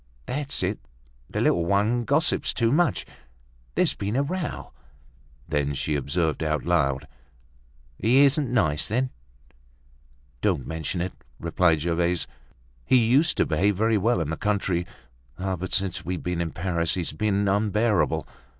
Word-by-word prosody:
"That's 140 -4 -2
it, 95 +3 -1 0.5
the - - -2
little 85 - +3
one 105 +7 +1
gossips 145 +5 +1
too 115 -1 +2
much. 170 +5 +2 0.7
There's - - +3
been 100 +3 -3
a 140 - +2
row." 170 +2 -4 0.7
Then, 75 -2 0
she 75 +3 -2
observed 80 +4 -1
out 75 -1 -1
loud, 70 -6 +1 0.9
"He 130 +7 +5
isn't 140 -1 +2
nice, 75 -11 +1
then?" 130 +4 0 1.3
"Don't - - +1
mention 80 +2 -3
it!" 90 +1 -3 0.3
replied 85 -1 +2
Gervaise. 85 +1 0 0.6
"He 130 - +4
used 130 +7 +3
to - - +3
behave 95 +6 +1
very 110 0 +2
well 115 0 +2
in 80 -1 -2
the 80 - -3
country; 95 -4 0 0.5
but, 95 -1 -3
since 95 -2 0
we've 90 0 -4
been 90 -1 -1
in 85 - -1
Paris, 85 -1 0
he's 85 -4 -2
been 100 +4 0
unbearable. 105 +2 +1
95 Hz, 140 wpm, -25 LUFS, 85-115 Hz, 1.3 s, He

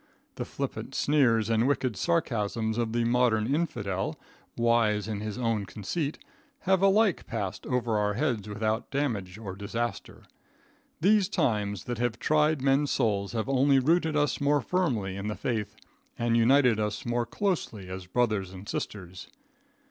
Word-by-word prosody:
The - - -5
flippant - - -5
sneers 125 -7 +3
and 115 +2 +2
wicked 130 -5 0
sarcasms 115 -8 0
of 115 -2 0
the 120 +1 +1
modern 120 0 +2
infidel, 105 - -2 0.4
wise 115 -3 +2
in 105 -2 -3
his 105 -1 -5
own 115 -5 -1
conceit, 140 - -3 0.4
have 190 -1 +2
alike 195 0 +3
passed 105 -5 -4
over 120 -4 0
our 105 0 0
heads 120 -8 -1
without 110 +2 -2
damage 110 -10 -2
or 100 -4 -7
disaster. 115 +4 -4 0.8
These 200 +1 +4
times 105 -4 0
that 120 -2 -4
have 120 -1 0
tried 150 +1 +2
men's 140 +1 +3
souls 100 -4 0
have 110 0 -2
only 135 +1 +4
rooted 160 +3 +2
us 150 0 +1
more 145 0 +3
firmly 120 - -1
in 100 +1 -4
the 105 - -2
faith, 110 -4 -3 0.4
and 115 0 +1
united 120 0 +4
us 105 0 -2
more 120 0 0
closely 160 - -2
as 95 0 -7
brothers 105 -3 0
and 95 +2 -10
sisters. 95 -3 -5
115 Hz, 150 wpm, -28 LUFS, 105-140 Hz, 0.8 s, These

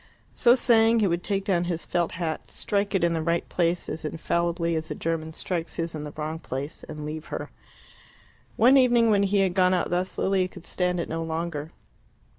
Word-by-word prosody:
So 240 0 +5
saying, 230 -2 +4
he 215 - +3
would 175 -1 0
take 195 -1 -1
down 175 -3 +1
his 170 -2 -3
felt 175 -1 -1
hat, 165 -2 -4
strike 200 0 -1
it 190 - +2
in 170 -1 +3
the 165 - -1
right 170 +1 0
place 175 0 0
as 160 - -5
infallibly 170 +1 -1
as 160 0 -3
a - - -3
German 160 -1 -2
strikes 170 +1 -4
his 165 0 -2
in 150 -1 -5
the 150 - -6
wrong 155 +1 -3
place, 140 0 -5
and 150 -1 -7
leave 155 +1 -5
her. - - -6 1.0
One 255 +4 +6
evening, 240 -3 +4
when 200 -1 +4
he 200 0 +2
had 190 -2 +1
gone 185 0 +4
out 175 - -1
thus, 180 +1 -1
Lilia 190 -1 +1
could 180 -2 -13
stand 180 -1 -1
it 170 - -2
no 165 +1 -3
longer. 160 -1 -3
170 Hz, 210 wpm, -26 LUFS, 160-195 Hz, 1.0 s, One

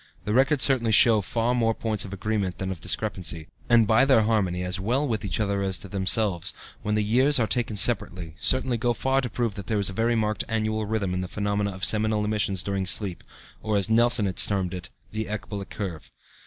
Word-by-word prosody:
The 105 - -1
records 135 +3 +3
certainly 120 -5 +3
show 110 0 +6
far 115 +4 -1
more 115 -2 +1
points 110 -3 -2
of 95 - -9
agreement 100 -2 -2
than 95 0 -4
of 90 - -7
discrepancy, 90 -7 -2 0.2
and 120 -2 +5
by 110 +4 +4
their 130 -5 +4
harmony, 95 -5 0
as 90 +1 -3
well 125 +9 0
with 110 -4 -2
each 100 -1 -2
other 100 -2 -1
as 95 -3 -2
with 100 - -11
themselves, 95 -2 0 0.3
when 105 0 -1
the 105 - +1
years 130 +7 +3
are 115 - +2
taken 115 -2 -2
separately, 90 -6 +1
certainly 130 -2 +1
go 120 +1 +1
far 135 +4 0
to 125 - -4
prove 115 -1 -2
that 100 -3 -9
there 110 - 0
is 100 -1 +2
a - - -9
very 115 +4 +1
marked 105 -2 -1
annual 110 -1 -1
rhythm 100 -4 -2
in 90 - -2
the 90 - -4
phenomena 100 +1 -2
of 95 0 -1
seminal 110 -1 +2
emissions 105 -3 0
during 100 -1 -2
sleep, 95 -2 +1 0.4
or, 105 -1 -1
as 100 +2 0
Nelson 120 -1 +3
has 95 - +2
termed 95 -3 0
it, 90 -1 -7 0.2
the 110 +1 -3
ecbolic 100 -1 -6
curve. 90 -7 -6
105 Hz, 220 wpm, -25 LUFS, 95-115 Hz, 0.4 s, show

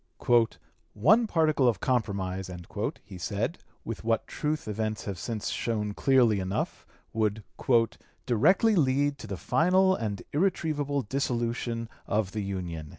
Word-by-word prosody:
"One 210 - +4
particle 155 -7 +3
of 115 -6 +2
compromise," 100 -7 -1 0.5
he 95 - -10
said, 100 - -2 0.3
with 115 -1 -5
what 115 0 +1
truth 150 -2 -3
events 110 0 -2
have 100 -3 -4
since 110 -3 -3
shown 105 -3 -2
clearly 120 -4 +3
enough, 95 +2 -3 0.3
would 110 -1 0 0.8
"directly 185 - +4
lead 145 -2 +2
to - - -8
the 100 -2 -4
final 185 - +3
and 105 -3 -3
irretrievable 145 -5 0
dissolution 120 -2 -2 0.2
of 105 -2 0
the 105 - -3
Union." 90 -6 -4
115 Hz, 125 wpm, -28 LUFS, 105-145 Hz, 0.8 s, One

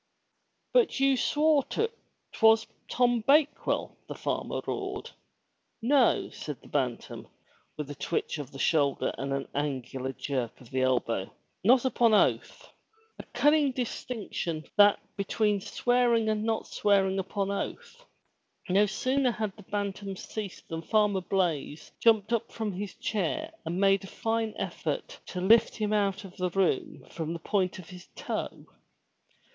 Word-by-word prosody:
"But 480 - +3
you 270 0 +4
swore 295 +2 +3
to*t, 455 +1 -1 0.4
'twas 225 0 +5 0.2
Tom 245 -1 +2
Bakewell!'* 290 +1 +2
the - - -6
farmer - - -2
roared. - - -4 0.7
"No," 255 +1 +3
said 150 -3 -7
the - - -17
Bantam, 130 -5 -3 0.5
with 150 -2 -4
a - - -4
twitch 155 +2 -2
of 140 -3 -6
the 135 - -10
shoulder 140 -1 +1
and 135 +1 -3
an 140 0 -2
angular 135 -2 -3
jerk 130 -4 -3
of 125 - -16
the 130 - 0
elbow. 120 -6 0 0.3
"Not 245 +5 +5
upon 235 -4 +4
oath!" - - +1 0.5
A - - -6
cunning, 295 -2 +3
distinction, 225 -10 -4
that 205 -1 +6 0.2
between 205 0 +1
swearing 240 0 +2
and 215 0 0
not 225 -1 0
swearing 195 -2 +2
upon 195 +1 -2
oath! 475 - -5 0.7
No 200 +3 +4
sooner 255 +5 +1
had 215 -4 -3
the - - -13
Bantam 200 0 -4
ceased 205 0 -7
than 165 0 -4
Farmer 210 +1 +2
Blaize 170 -5 -1
jumped 225 -1 +3
up 230 - -1
from 220 -2 -3
his 195 +2 -6
chair 220 - -2
and 175 +3 -2
made 195 0 +4
a - - -8
fine 225 +1 -2
effort - - -4
to 180 - -5
lift 220 +4 +5
him 215 -1 -1
out 200 0 +1
of 190 -2 -12
the 180 0 0
room 190 +1 0
from 165 0 -4
the - - -3
point 190 -4 0
of 185 - -11
his 180 -1 -11
toe. - - -4
205 Hz, 150 wpm, -29 LUFS, 170-230 Hz, 0.7 s, that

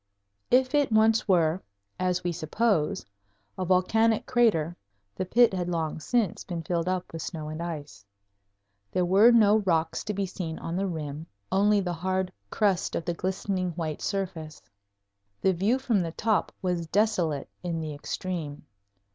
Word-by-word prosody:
If 255 +2 +3
it 290 -4 +2
once 220 +1 +4
were, 175 -2 +3 0.4
as 180 0 0
we 175 - 0
suppose, 160 - 0 0.5
a 185 - -3
volcanic 210 +5 +2
crater, 200 -10 +2 0.4
the 185 - -2
pit 235 +2 +5
had 180 -2 -2
long 160 -3 -2
since 225 +2 0
been 170 -3 -5
filled 170 +1 -1
up 185 -2 -3
with 165 - -5
snow 155 -3 -5
and 155 +2 -5
ice. 150 - -6 0.9
There 180 - +1
were 195 +6 +6
no 220 -3 +6
rocks 165 -6 0
to 210 - -2
be 200 0 0
seen 175 -3 -5
on 165 - -5
the 195 +2 0
rim 155 -2 -5 0.2
only 205 +1 +4
the 180 -2 -2
hard 185 +2 -2 0.2
crust 200 - +1
of 165 - -3
the 175 - -1
glistening 185 0 -2
white 160 -2 -4
surface. 170 -6 -4 0.8
The 190 - +2
view 200 +8 +2
from 255 -6 +1
the 165 -2 -2
top 215 -4 0
was 175 -2 -1
desolate 175 -7 +1
in 170 -2 -3
the 155 -1 -4
extreme. 150 0 -5
180 Hz, 160 wpm, -27 LUFS, 165-205 Hz, 0.9 s, were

